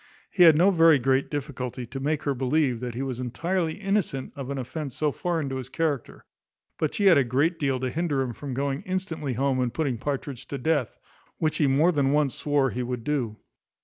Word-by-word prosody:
He 185 - 0
had 165 -3 +8
no 185 +5 +5
very 165 -4 +6
great 130 +1 +1
difficulty 130 -4 -4
to 130 +4 -7
make 150 +2 -1
her 140 - 0
believe 130 -1 +1
that 120 -1 -5
he 130 - -2
was 130 -2 -4
entirely 165 +7 -1
innocent 195 -10 -1
of 135 -2 -6
an 140 - -3
offence 135 +1 -5
so 150 -1 +1
foreign 165 -1 -2
to 135 - -3
his 130 -1 -6
character; 150 -4 -2 0.5
but 155 - -1
she 205 - +1
had 180 -7 +7
a - - +4
great 145 +8 +1
deal 135 -3 0
to 130 0 -2
hinder 155 -3 0
him 125 -2 -4
from 135 +1 -6
going 140 +1 -1
instantly 165 -7 -3
home, 135 +2 0
and 125 -2 -2
putting 140 -8 -1
Partridge 140 -2 -4
to 140 - -4
death, 140 -3 0 0.4
which 155 -1 0
he 150 - +3
more 145 +6 +4
than 140 -4 +1
once 145 -4 +2
swore 145 -3 +1
he 125 - -3
would 125 -1 -4
do. 120 -6 -1
140 Hz, 215 wpm, -26 LUFS, 130-160 Hz, 0.5 s, had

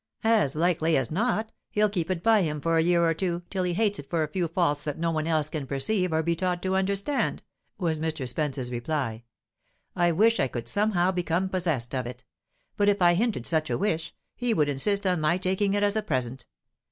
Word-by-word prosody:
"As 220 -12 +3
likely 165 -1 +2
as 130 0 -1
not, 220 +4 0 0.2
he'll 210 0 +2
keep 180 -5 -2
it 180 -2 -2
by 225 -2 +5
him 150 -4 -1
for 165 +3 0
a 165 - +4
year 170 0 +3
or 165 - +2
two, 175 0 -2
till 190 - -1
he 175 -1 -1
hates 205 0 +1
it 140 - -10
for 165 -2 +1
a - - -2
few 175 +3 -1
faults 160 -4 0
that 150 -2 -3
no 165 0 0
one 155 -1 -1
else 155 -2 +1
can 150 -4 -5
perceive 180 +7 0
or 160 0 +1
be 170 +1 +1
taught 180 0 -1
to 190 0 0
understand," 200 +8 0 0.3
was 165 -6 -1
Mr. 155 -4 -2
Spence's 130 -2 -2
reply. 120 -2 -3 0.7
"I 175 -1 +3
wish 220 +7 +3
I 135 - +2
could 120 -2 -6
somehow 200 -3 +2
become 180 +1 -1
possessed 160 -11 -2
of 130 -2 -2
it. 125 0 -9 0.5
But 205 0 +4
if 205 - +2
I 175 -1 +5
hinted 205 - 0
such 160 -1 0
a - - 0
wish, 165 -5 -2 0.2
he 245 -2 0
would 150 -2 +2
insist 200 +9 +1
on 180 -4 +1
my 155 +3 +2
taking 190 +2 0
it 205 - +1
as 205 0 +2
a 220 - +1
present. 130 - -3
170 Hz, 225 wpm, -26 LUFS, 150-195 Hz, 0.7 s, by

